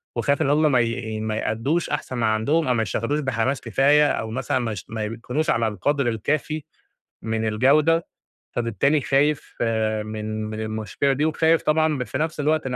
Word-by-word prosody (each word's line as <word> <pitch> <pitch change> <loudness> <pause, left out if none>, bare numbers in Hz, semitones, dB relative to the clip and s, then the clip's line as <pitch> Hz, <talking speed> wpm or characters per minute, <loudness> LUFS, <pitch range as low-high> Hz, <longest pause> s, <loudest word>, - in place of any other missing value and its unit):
وخايف 140 +4 +1
إن 135 - +2
هم 150 +1 +3
ما 130 - +4
ي 115 -2 -2
ما 110 0 -2
يأدّوش 130 +11 -1
أحسن 130 - -3
من 115 - -1
عندهم 115 +9 +1
أو 125 - +3
ما 115 - +1
يشتغلوش 115 +7 -1
بحماس 130 -1 -1
كفاية 140 +5 +4
أو 110 0 -3
مثلًا 130 +2 -1
ما 120 -3 -2
يش 100 -5 -6
ما 110 -1 -3
يكونوش 125 +8 -3
على 115 -1 +2
القدر 135 +7 0
الكافي 145 +7 -1 0.6
من 110 0 -2
الجودة، 145 +9 +3 0.5
فبالتالي 120 +6 +1
خايف 140 +2 +1 0.5
من 110 0 -4
من 110 0 -5
المشكلة 110 +5 -1
دي 145 +3 0
وخايف 160 +1 +2
طبعًا 155 -3 +2
في 105 - -5
نفس 160 0 -2
الوقت 155 +1 +1
إن 125 -1 -2
125 Hz, 180 wpm, -23 LUFS, 110-150 Hz, 0.6 s, ما